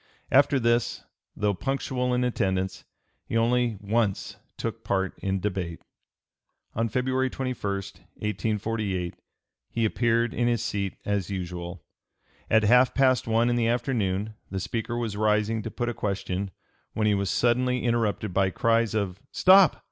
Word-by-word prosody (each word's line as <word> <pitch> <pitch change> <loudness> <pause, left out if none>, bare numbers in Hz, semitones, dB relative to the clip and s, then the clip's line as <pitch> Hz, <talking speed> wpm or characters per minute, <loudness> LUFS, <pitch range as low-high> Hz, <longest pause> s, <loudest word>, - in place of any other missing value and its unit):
After 140 0 +5
this, 120 0 +1 0.3
though 105 0 +1
punctual 125 +2 -1
in 125 - +1
attendance, 95 -6 -1 0.4
he 115 - -2
only 120 -1 +2
once 105 -1 -1 0.2
took - - -4
part 95 -1 0
in 95 0 -1
debate. 90 -4 -3 0.9
On 115 +1 0
February 130 +2 0
21, 130 0 -3 0.3
1848, 105 -3 -3 0.6
he 115 -1 0
appeared 115 +1 +1
in 120 - +1
his 120 -2 +1
seat 100 -3 -2
as 100 -3 -1
usual. 90 -3 -5 0.7
At 110 0 +4
half 125 +4 +5
past 130 -4 +3
one 115 +1 +3
in 120 - +2
the 115 -1 +2
afternoon 110 -4 0 0.2
the 95 - -3
Speaker 115 +4 -3
was 115 -4 -2
rising 105 +1 +1
to 115 - -5
put 120 +2 -3
a 120 - -1
question, 100 -2 -2 0.4
when 110 - 0
he 105 - +4
was 100 -1 0
suddenly 125 +3 +2
interrupted 110 -4 0
by 95 +1 +3
cries 115 +2 +1
of 100 -3 -1
"Stop! 190 -1 +6
110 Hz, 145 wpm, -26 LUFS, 100-120 Hz, 0.9 s, Stop